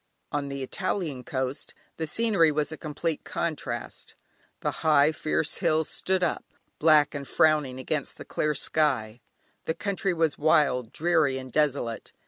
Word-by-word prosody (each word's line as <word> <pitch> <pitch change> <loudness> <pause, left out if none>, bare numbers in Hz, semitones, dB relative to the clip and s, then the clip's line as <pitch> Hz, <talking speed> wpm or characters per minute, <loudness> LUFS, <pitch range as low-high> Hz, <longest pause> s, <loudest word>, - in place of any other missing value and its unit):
On 145 -1 -2
the 140 -1 -4
Italian 155 -4 -2
coast 130 +2 -3 0.2
the 160 - -2
scenery 195 -4 +3
was 150 +1 -1
a - - -4
complete 155 0 -3
contrast, 145 -8 -4 0.5
the - - 0
high, 150 -1 +5
fierce 155 0 -1
hills 155 0 +1
stood 190 -1 0
up 170 - 0 0.4
black 150 -2 +5
and 140 -2 -5
frowning 150 -5 +2
against 140 +3 -3
the - - -9
clear 150 0 -1
sky, 130 -7 0 0.4
the 160 - -1
country 195 0 -1
was 160 -2 +1
wild, 145 -7 +3
dreary 160 -5 +2
and 130 -1 -8
desolate. 140 -6 -1
150 Hz, 145 wpm, -27 LUFS, 140-160 Hz, 0.5 s, high